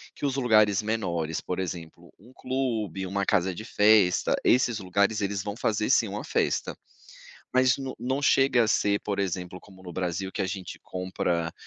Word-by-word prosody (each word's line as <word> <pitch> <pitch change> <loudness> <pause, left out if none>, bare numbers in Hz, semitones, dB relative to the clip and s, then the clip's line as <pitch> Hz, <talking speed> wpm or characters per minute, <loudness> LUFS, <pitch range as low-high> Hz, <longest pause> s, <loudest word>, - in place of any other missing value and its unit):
que 145 - -2
os 135 - -2
lugares 110 -5 +3
menores, 85 -8 -2
por 90 - -4
exemplo, 85 -2 -6
um 115 +6 -18
clube, 115 -9 -3
uma 100 +1 -1
casa 90 0 +1
de 110 - -7
festa, 105 -5 +4
esses 120 -2 +3
lugares, 100 +2 0
eles 100 -1 -1
vão 100 +1 -5
fazer 110 -2 0
sim 120 -4 +4
uma 105 +2 -5
festa, - - -1 0.8
mas 130 0 +4
n 135 -1 -5
não 130 +2 -1
chega 135 -3 +4
a - - 0
ser, 100 -2 +2
por 100 -1 -3
exemplo, 90 -1 -3
como 95 -1 -17
no 90 - -8
Brasil, 95 +1 -3
que 105 - -3
a 95 - -1
gente 95 0 -6
compra 90 -2 -2
100 Hz, 180 wpm, -27 LUFS, 90-115 Hz, 0.8 s, festa